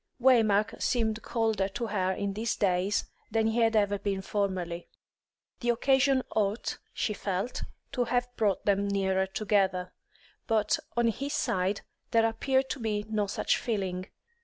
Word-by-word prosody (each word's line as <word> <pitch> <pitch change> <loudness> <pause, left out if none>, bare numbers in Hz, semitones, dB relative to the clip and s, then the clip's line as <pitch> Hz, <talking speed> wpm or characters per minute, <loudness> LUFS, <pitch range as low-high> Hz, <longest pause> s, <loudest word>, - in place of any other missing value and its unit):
Waymark 220 -5 +4
seemed 225 -2 +1
colder 220 -5 0
to 235 +4 -3
her 190 -4 0
in 200 +1 -2
these 220 +3 -1
days 190 +1 +1 0.2
than 225 -1 +1
he 225 +2 +1
had 225 -1 +3
ever 205 -1 +2
been 195 -1 -2
formerly. 185 -4 -2 0.7
The 240 - -1
occasion 265 +2 +3
ought, 210 +1 -1
she 215 - -1
felt, 200 +3 -3 0.3
to 250 -3 0
have 245 0 -1
brought 205 -4 +1
them 200 0 +2
nearer 190 -1 +1
together; 190 -3 0 0.5
but 225 +7 +2 0.2
on 235 -1 +4
his 275 +5 -3
side 190 +2 0 0.3
there 225 0 +4
appeared 265 +4 +1
to - - -3
be 210 -2 -1
no 210 -2 +1
such 195 - +1
feeling. 190 -5 -2
210 Hz, 150 wpm, -29 LUFS, 195-230 Hz, 0.7 s, Waymark